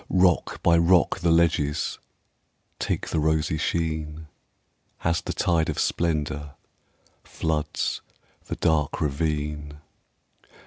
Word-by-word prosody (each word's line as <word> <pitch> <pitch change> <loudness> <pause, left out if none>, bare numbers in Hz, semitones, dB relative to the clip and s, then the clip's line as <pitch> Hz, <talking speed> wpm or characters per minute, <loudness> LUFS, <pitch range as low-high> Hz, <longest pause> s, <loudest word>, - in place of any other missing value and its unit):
Rock 90 -2 +2
by 85 -1 +5
rock 85 +2 +4
the 85 -1 +1
ledges 80 -3 +2 0.8
Take - - -2
the 80 - 0
rosy 80 0 +1
sheen, 80 -2 -2 0.7
As 85 0 +1
the - - -4
tide 85 -2 +1
of 75 - -2
splendor 75 -3 -1 0.7
Floods 80 -2 -2 0.4
the - - -4
dark 75 -3 +1
ravine. 75 0 -2
80 Hz, 100 wpm, -25 LUFS, 75-85 Hz, 0.8 s, by